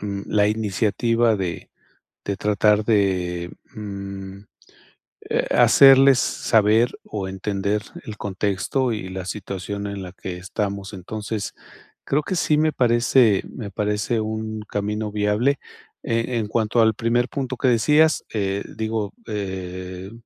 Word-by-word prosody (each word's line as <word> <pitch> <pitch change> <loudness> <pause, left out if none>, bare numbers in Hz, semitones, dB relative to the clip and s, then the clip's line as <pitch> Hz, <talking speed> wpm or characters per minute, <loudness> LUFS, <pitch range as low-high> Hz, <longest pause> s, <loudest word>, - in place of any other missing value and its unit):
mm, 100 -1 -4
que - - -10
la 105 -1 +3
iniciativa 110 +2 +1
de 90 -3 -4 0.5
de 100 -1 -2
tratar 105 +1 +2
de, 90 -5 0 0.2
mm, 100 -2 -7 0.9
eh, - - +1
hacerles 135 -1 +7
saber 110 +2 +2
o 100 -3 -5
entender 100 +2 -2 0.2
el 110 - -7
contexto 100 +6 -1
y 105 -4 -4
la 95 0 -5
situación 100 0 -5
en 100 -1 -5
la 90 - -9
que 95 -1 -7
estamos. 100 +1 -4
Entonces, 105 +2 -5 0.5
creo 145 +2 +1
que 185 +4 -3
sí 155 -1 +2
me 155 +1 +3
parece 120 -4 +3
me 105 -5 -7
parece 105 +3 -1
un 110 0 -4
camino 105 +1 -2
viable, 105 +7 +1 0.5
e 115 +2 -1
en 110 - -1
cuanto 110 +2 +1
al 110 0 +4
primer 120 +3 +1
punto 130 -2 -3
que 130 - -1
decías, 150 +7 +4
eh, 100 -2 -1
digo, 110 -2 -2
eh, 95 -2 -5
105 Hz, 135 wpm, -22 LUFS, 100-115 Hz, 0.9 s, hacerles